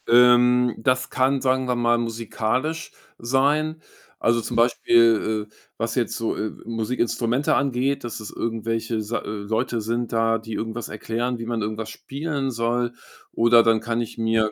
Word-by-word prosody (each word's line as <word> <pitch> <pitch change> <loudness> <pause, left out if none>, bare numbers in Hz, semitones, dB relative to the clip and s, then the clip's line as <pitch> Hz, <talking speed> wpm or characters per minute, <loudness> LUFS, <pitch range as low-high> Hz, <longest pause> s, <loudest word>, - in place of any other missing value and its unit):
Ähm, 125 0 +5
das 130 +3 +1
kann, 130 +1 +1
sagen 130 0 +1
wir 125 - +1
mal, 120 0 +2
musikalisch 115 +6 -2 0.3
sein. 145 +6 +1 0.4
Also, 115 0 +2
zum - - -5
Beispiel, 115 -2 +3
äh, - - -30 0.2
was 115 +1 -2
jetzt 125 -3 0
so, 115 - -2
äh, 110 - -3
Musikinstrumente 115 +3 0
angeht, 140 +1 0
dass 120 -1 -5
es 105 - -7
irgendwelche, 115 0 -2
sei 110 +3 -3
äh, - - -8
Leute 110 +3 -2
sind 115 +2 -2
da, 115 0 +2
die 110 0 -8
irgendwas 110 +1 -4
erklären, 115 +3 -3
wie 115 - -5
man 120 -2 -2
irgendwas 110 +1 -4
spielen 140 +2 -4
soll. 120 +1 -1 0.4
Oder 115 0 +5
dann 115 -1 +3
kann 115 +1 -2
ich 115 - -6
mir, 110 -1 +2
115 Hz, 160 wpm, -23 LUFS, 115-125 Hz, 0.4 s, Ähm